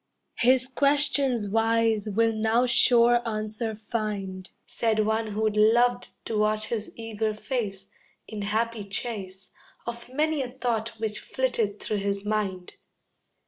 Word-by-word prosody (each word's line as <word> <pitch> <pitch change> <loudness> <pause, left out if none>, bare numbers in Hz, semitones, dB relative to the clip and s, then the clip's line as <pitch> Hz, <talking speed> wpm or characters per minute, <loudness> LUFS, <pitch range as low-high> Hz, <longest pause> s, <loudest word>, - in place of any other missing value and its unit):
"His 255 +1 +4
questions 275 -4 +2
wise 225 0 +2
will 225 +2 +2
now 220 +3 +2
sure 240 -1 +4
answer 220 0 -3
find," 205 -4 -4 0.2
Said 220 -2 0
one 220 +1 0
who'd 215 0 0
loved 240 +3 +3 0.2
to 220 -2 -1
watch 215 0 +1
his 220 -2 -3
eager 220 -1 -2
face, 210 -5 -4 0.4
In 215 -1 -6
happy 220 +2 -1
chase 195 -2 -5 0.4
Of 235 +1 -7
many 305 +2 +1
a 255 - -3
thought 230 -3 -3
which 215 -1 -2
flitted 230 -6 -1
through 215 - -2
his 200 0 -2
mind. 200 -4 -2
220 Hz, 130 wpm, -26 LUFS, 210-240 Hz, 0.4 s, His